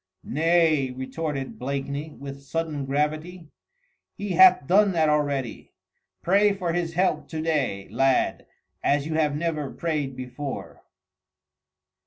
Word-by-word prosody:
"Nay!" 160 -2 +2
retorted 135 +2 -5
Blakeney 140 +3 -3
with 140 -2 -9
sudden 150 -1 -3
gravity. 155 +4 -2 0.7
"He 205 - -4
hath 185 -4 +6
done 195 +4 +4
that 160 -2 +3
already. 145 -5 -1 0.5
Pray 200 +3 +4
for 180 -4 -2
His 165 -1 -2
help 185 +2 +1
to 160 - -5
day, 140 -12 -1
lad, 135 -1 +1 0.4
as 145 0 +2
you 160 - -3
have 150 -2 +1
never 155 -3 -2
prayed 150 -5 -3
before." 130 +2 -6
150 Hz, 120 wpm, -25 LUFS, 140-165 Hz, 0.7 s, hath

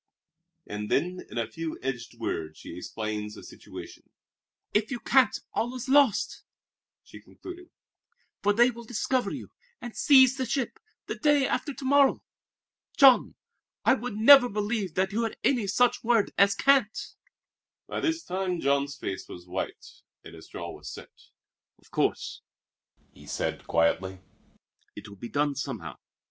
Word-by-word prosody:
And 105 0 -5
then, 180 +5 0
in - - -8
a 115 - 0
few 160 +8 -6
edged 125 -3 -4
words, 80 -1 -4
she - - -10
explained 105 +2 -5
the - - -11
situation. - - -11 0.6
"If 210 +1 +1
you 245 - -3
can't, 260 -3 +3
all 240 +3 -1
is 255 - -6
lost," 275 -4 +3 0.6
she - - -13
concluded, 360 0 -11 0.7
"for 205 - +3
they 240 +4 +4
will 235 0 -10
discover 245 +2 -1
you, - - -7 0.3
and 240 -2 -8
seize 265 -2 +6
the 260 -2 -2
ship, 270 - -2 0.3
the - - -3
day 295 -3 +3
after 290 - -1
to 265 - -8
morrow. 280 0 +4 0.7
Jean, 270 -3 +6 0.5
I - - +6
would 240 -1 -4
never 245 +3 +8
believe 205 -4 -2
that 190 +1 +1
you 220 +3 0
had 225 -1 -3
any 240 -7 +2
such 245 +5 +2
word 230 -3 +2
as 200 0 +4
'can't.'" 270 -3 +2 0.7
By - - -4
this 330 0 -1
time 185 -1 -2
Jean's 140 0 0
face 95 -7 -5
was 90 0 -10
white 90 - -6 0.2
and - - -12
his 80 -1 -13
jaw - - -7
was - - -9
set. - - -11 0.6
"Of - - -25
course," - - -1 0.7
he - - -16
said - - -3
quietly, 95 +3 +1 0.8
"it 105 +1 -9
will 100 -1 -12
be 120 +4 -8
done 145 0 +1
somehow. 140 - -6
210 Hz, 155 wpm, -27 LUFS, -, 0.8 s, never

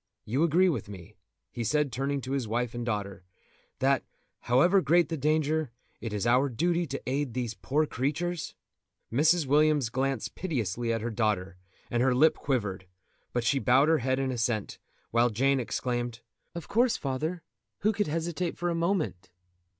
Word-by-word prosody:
You 130 +7 0
agree 170 +3 +4
with 130 - -1
me," 95 0 -10 0.4
he 120 - -4
said, 150 +3 +1
turning 135 +3 -1
to 130 - -6
his 135 -4 -1
wife 120 +2 -1
and 120 0 -4
daughter, 100 -6 -3 0.5
"that, 135 0 +2 0.4
however 175 +11 +4
great 170 +2 +3
the 165 - -1
danger, 155 0 +1 0.3
it 115 - -5
is 105 +1 -2
our 125 +4 +3
duty 170 +7 0
to 140 0 -5
aid 130 -1 -2
these 120 -3 -2
poor 135 +10 0
creatures?" 155 +5 -2 0.6
Mrs. 155 +5 +4
Williams 145 -2 +3
glanced 130 0 -2
piteously 120 - -2
at 115 -1 -1
her 120 +1 -3
daughter, 105 -4 -1 0.4
and 120 - +1
her 130 0 +3
lip 155 +5 +5
quivered, 100 -9 -2 0.4
but 120 - -1
she 135 +5 +2
bowed 135 +4 +4
her 160 - +4
head 130 +1 0
in 135 -1 -1
assent, 115 -4 -2 0.3
while 120 +1 +3
Jane 135 +5 +2
exclaimed: 120 0 -3 0.3
"Of 170 - -6
course, 240 +2 +2
father; 155 +6 -3 0.4
who 215 +3 +2
could 205 -1 0
hesitate 165 +2 -2
for 175 0 -1
a - - 0
moment?" 165 - -1
135 Hz, 170 wpm, -28 LUFS, 120-155 Hz, 0.6 s, lip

